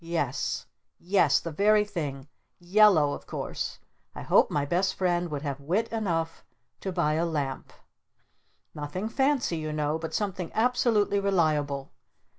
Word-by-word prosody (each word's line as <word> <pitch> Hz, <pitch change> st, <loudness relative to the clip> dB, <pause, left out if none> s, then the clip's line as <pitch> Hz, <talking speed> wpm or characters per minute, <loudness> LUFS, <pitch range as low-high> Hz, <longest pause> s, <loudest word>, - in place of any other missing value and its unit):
Yes 165 Hz, -6 st, -2 dB, 0.3 s
Yes! 170 Hz, -6 st, +3 dB
The 165 Hz, -, -6 dB
very 210 Hz, +5 st, +3 dB
thing! 145 Hz, -9 st, -5 dB, 0.3 s
Yellow 175 Hz, -5 st, +4 dB
of -, -, -8 dB
course! -, -, -4 dB, 0.4 s
I -, -, -6 dB
hope -, -, +4 dB
my 145 Hz, -1 st, 0 dB
Best 180 Hz, +5 st, 0 dB
Friend 175 Hz, -2 st, 0 dB
would 145 Hz, -1 st, -4 dB
have 140 Hz, -2 st, -4 dB
wit 190 Hz, +11 st, 0 dB
enough 170 Hz, -8 st, -2 dB, 0.4 s
to 190 Hz, -, -4 dB
buy 170 Hz, -4 st, +1 dB
a 160 Hz, +2 st, +1 dB
Lamp! 145 Hz, -5 st, -3 dB, 1.0 s
Nothing 150 Hz, +8 st, -4 dB
fancy 265 Hz, -, +1 dB
you 155 Hz, -1 st, -4 dB
know 150 Hz, +1 st, -1 dB
but 160 Hz, 0 st, -5 dB
something 190 Hz, -4 st, -2 dB
absolutely 225 Hz, -4 st, +2 dB
reliable. 155 Hz, -8 st, 0 dB
170 Hz, 140 wpm, -27 LUFS, 150-200 Hz, 1.0 s, Yellow